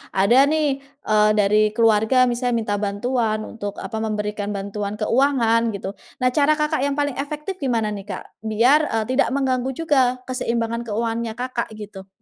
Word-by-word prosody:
ada 240 +9 +5
nih, 295 -3 +1
eee, 275 -7 0
dari 210 +1 +3
keluarga 225 +3 +4
misalnya 245 0 -1
minta 215 -3 -1
bantuan 215 +1 -1
untuk 205 -3 -6
apa 220 - -6
memberikan 210 -1 -3
bantuan 200 +1 -4
keuangan 230 0 +2
gitu, 195 0 -5 0.3
nah, 250 - +3
cara 300 +2 +3
Kakak 300 +1 0
yang 280 +1 0
paling 285 -3 -1
efektif 300 +6 -5
gimana 230 -6 0
nih 205 -1 -7
Kak? - - -5 0.2
Biar, 240 +8 +3
eee, 225 -1 -1
tidak 260 - +3
mengganggu 260 -1 0
juga 260 -6 +1
keseimbangan 235 -2 -2
keuangannya 225 +1 -2
Kakak 250 -1 -3
gitu? 205 -2 -10
235 Hz, 155 wpm, -22 LUFS, 215-265 Hz, 0.3 s, ada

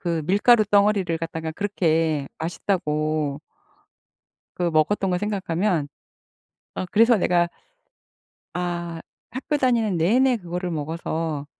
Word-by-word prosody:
그 170 -3 -1
밀가루 215 +4 +5
덩어리를 200 -4 +2
갖다가 160 -1 -4
그렇게 160 -6 0
맛있다고 155 -4 -1 1.2
그 175 -1 0
먹었던 185 +5 +1
거 180 - +1
생각하면 185 -5 -1 0.9
어 - - -3
그래서 230 +2 +5
내가 175 -3 +2 1.1
'아 175 -2 -3 0.3
학교 265 +5 -2
다니는 235 -8 +1
내내 245 +10 +3
그거를 180 -2 -4
먹어서 160 -1 -3
175 Hz, 245 characters per minute, -23 LUFS, 160-205 Hz, 1.2 s, 밀가루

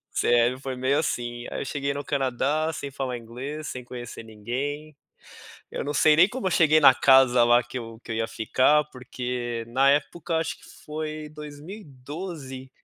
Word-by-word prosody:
Sério, 120 +2 +3
foi 135 -1 -5
meio 130 +3 +1
assim 120 -5 -3
aí - - -4
eu - - -4
cheguei 140 +1 -2
no 145 0 -5
Canadá, 140 +4 0
sem 140 - -5
falar 130 -2 -4
inglês, 130 +7 -7
sem 125 - -6
conhecer 120 -2 -8
ninguém. 135 +8 -5 0.8
Eu - - -4
não 145 - -2
sei 155 +1 +5
nem 180 +5 +6
como 240 -1 -5
eu - - +2
cheguei 155 -3 +5
na 135 -3 +8
casa 130 -2 +5
lá 120 +1 +5
que 120 +2 -10
eu 115 -1 -9
que 115 - -5
eu - - -3
ia 115 0 -1
ficar, 130 +7 +2
porque 125 -2 -4
na 135 +3 +4
época, 165 +4 0
acho 160 0 -1
que - - -19 0.2
foi 155 0 -5
2012, 150 -2 -9
135 Hz, 180 wpm, -25 LUFS, 120-150 Hz, 0.8 s, na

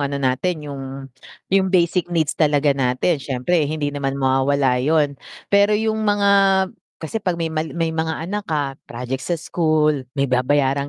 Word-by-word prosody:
ano 140 0 -1
natin, 140 +5 -1
yung 140 -2 -6 0.7
yung 190 -1 +3
basic 175 -1 +1
needs 165 -3 0
talaga 145 -2 +2
natin 135 +4 0
siyempre 140 +4 0
hindi 150 -2 -2
naman 140 -1 -2
mawawala 135 -1 +2
yun. 150 +1 +2 0.4
Pero 200 +1 +5
yung 220 0 -1
mga 205 -1 +2 0.7
kasi 190 +8 -5
'pag 180 -3 -1
may 165 -1 -3
mal 160 0 -2
may 165 -1 0
mga 160 0 -2
anak 205 +3 -4
ka, 145 -4 -2
project 125 +2 -4
sa 175 +5 -1
school, 155 -5 0
may 140 - +2
babayarang 140 +2 +1
150 Hz, 160 wpm, -21 LUFS, 135-170 Hz, 0.7 s, Pero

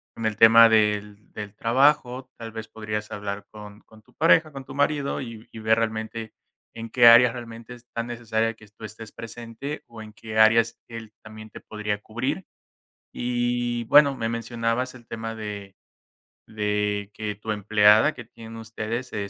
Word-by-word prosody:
en 115 - -5
el 110 -1 -3
tema 115 +1 +8
del 105 -1 0
del 105 -1 -8
trabajo, 130 +1 +2
tal 115 -1 -8
vez, 110 0 -7
podrías 105 -1 -5
hablar 100 0 -5
con 105 -1 -12
con 110 -1 -20
tu - - -26
pareja, 160 0 +4
con 135 -1 -8
tu 135 - -10
marido, 145 0 0
y 115 -4 -9
y - - -11
ver 110 0 +2
realmente 110 0 -4 0.4
en 115 0 -7
qué 120 -2 +6
área, 115 +1 +8
realmente 115 0 -9
es 120 0 -16
tan 115 0 -2
necesaria, 115 -1 -1
que 110 -1 -18
tú 105 +2 -12
estés 110 +1 -10
presente, 115 +5 -8
o 115 -1 -11
en 110 -1 -13
qué 110 0 -8
áreas, 115 +1 +4
él 115 -2 -9
también 110 0 -11
te - - -12
podría 105 -1 -4
cubrir. 125 - -4 0.7
Y 120 0 -1
y - - -7
bueno, 140 +2 +5
me 115 - -2
mencionabas 115 +2 -2
el 120 -2 -15
tema 115 0 -6
de 105 -3 -8 0.7
de 105 -1 -2
que, 105 -1 -4
tu 105 +2 -6
empleada, 105 +5 +4
que 120 - -10
tienen 115 0 -12
ustedes, 115 +2 -5
eh, 100 -2 -3
115 Hz, 175 wpm, -24 LUFS, 110-120 Hz, 0.7 s, tema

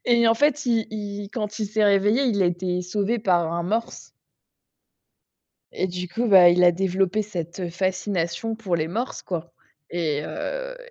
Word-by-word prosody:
et 235 -1 +4
en 225 - +5
fait, 290 +2 +1
il 225 -2 +1
il 205 -1 -5
quand 210 -2 -4
il 215 - -1
s'est 215 +1 +1
réveillé, 205 +5 +3
il 205 -6 +2
a - - +3
été 180 +1 -1
sauvé 205 +5 -1
par 175 -5 +1
un 170 0 -1
morse 225 +6 -3 1.6
et - - -1
du 180 -1 -5
coup, 235 +7 -2
bah, 185 -4 +8
il 180 +1 +4
a 175 - +6
développé 190 +3 0
cette 175 -2 -5
fascination 185 +2 -2
pour 190 -6 -1
les 155 0 -2
morses, 230 +9 -4
quoi 170 -2 -5 0.4
et 155 -4 -1
heu, - - -5
195 Hz, 170 wpm, -24 LUFS, 175-225 Hz, 1.6 s, bah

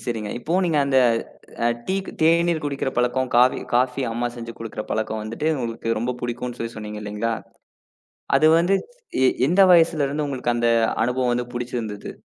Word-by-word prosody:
சரிங்க. 110 -3 -3
இப்போ 155 +8 -3
நீங்க 165 -4 +1
அந்த 135 -1 +3 0.9
டீக் 190 0 -1
தேநீர் 165 0 +3
குடிக்கிற 140 -2 -2
பழக்கம், 125 +1 +1
காவி 125 +1 +5 0.2
காஃபி 125 +2 +2
அம்மா 120 +1 -1
செஞ்சு 115 0 -7
கொடுக்கிற 115 -1 -5
பழக்கம் 110 0 -2
வந்துட்டு 115 +8 -3
உங்களுக்கு 115 -1 -2
ரொம்ப 125 +2 -2
புடிக்கும்னு 120 0 -4
சொல்லி 115 0 -5
சொன்னீங்க 105 0 -6
இல்லீங்களா? 105 +2 -2 1.1
அது 155 - +5
வந்து 175 +4 +3 0.5
எ - - +6 0.2
எந்த 185 +4 +4
வயசுல 165 -3 +4
இருந்து 150 +2 -2
உங்களுக்கு 125 -3 -1
அந்த 120 0 +1 0.4
அனுபவம் 125 +1 0
வந்து 120 0 -1
பிடிச்சிருந்தது? 120 -4 -4
125 Hz, 155 wpm, -23 LUFS, 115-145 Hz, 1.1 s, எ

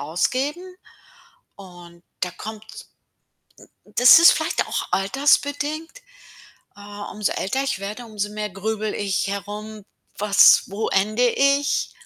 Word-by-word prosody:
ausgeben. 280 - -3 0.8
Und 175 -3 -15 0.2
da 180 - -2
kommt 215 +4 -9
n 220 0 -15 1.1
n - - -22
das 250 +6 +9
ist 340 - +9
vielleicht - - -1
auch - - -3
altersbedingt. 285 - 0 0.9
Äh, 205 - -14 0.3
umso 210 -1 -2
älter 265 +8 -2
ich 270 -8 -3
werde, 210 +5 -7
umso 210 -2 -4
mehr 210 0 -5
grüble 215 +2 -4
ich 200 -3 -2
herum: 205 +1 -7 0.3
„Was 205 -1 +5
wo 205 +3 -4
ende 215 +5 +1
ich?“ 280 +2 +1
215 Hz, 125 wpm, -22 LUFS, 200-270 Hz, 1.1 s, das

